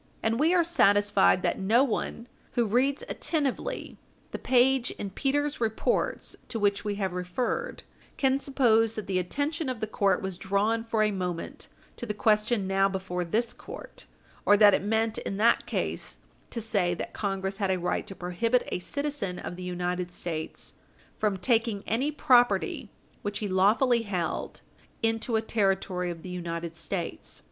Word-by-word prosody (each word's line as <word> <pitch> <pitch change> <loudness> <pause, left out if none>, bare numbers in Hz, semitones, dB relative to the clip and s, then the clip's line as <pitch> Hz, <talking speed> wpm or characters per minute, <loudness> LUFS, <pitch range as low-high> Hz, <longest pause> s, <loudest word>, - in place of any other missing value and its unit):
And 225 +2 +1
we 315 +3 +4
are 355 -1 +4
satisfied 205 - +4
that - - 0
no 225 +7 +4
one 235 -2 -2 0.3
who 240 - +2
reads 255 +6 +1
attentively 315 - -2 0.3
the - - -5
page 255 0 +3
in 200 - -6
Peters' 290 +5 0
Reports 220 -1 0
to 230 - -4
which 200 -1 +1
we 205 -1 -2
have 190 -3 -2
referred 205 - -2 0.3
can 270 0 +2
suppose 225 -5 +3
that 215 - -4
the 185 -1 0
attention 285 - -2
of 255 -3 -3
the 215 - -1
court 200 -2 +1
was 190 -2 -4
drawn 205 +4 +1
for 225 -1 +1
a 210 - +2
moment 180 -3 -4 0.3
to 240 - -5
the 210 - -2
question 210 0 +2
now 195 +1 +2
before 190 -2 -3
this 225 +7 0
court, - - -10 0.4
or 205 - +6
that 205 -1 +7
it - - +2
meant 220 +2 0
in 195 - -4
that 230 +3 +3
case - - -3 0.3
to 235 - -4
say 200 -6 +1
that - - -6
Congress 195 -1 -2
had 195 -2 0
a 190 - +2
right 175 0 -2
to 195 - -6
prohibit 225 +8 0
a - - -1
citizen 280 -4 -3
of - - -6
the 180 - -9
United 180 0 -2
States 165 -3 -5 0.5
from 210 -3 +1
taking 225 -1 +1
any 260 +7 0
property 245 -4 +3 0.3
which 205 0 -3
he 210 - -2
lawfully 215 +6 +3
held 190 -6 -3 0.4
into 225 +1 +1
a 220 - +1
Territory 195 -4 0
of 165 -2 -7
the 185 - -7
United 170 -2 -4
States. 170 +2 -4
210 Hz, 170 wpm, -28 LUFS, 190-240 Hz, 0.5 s, that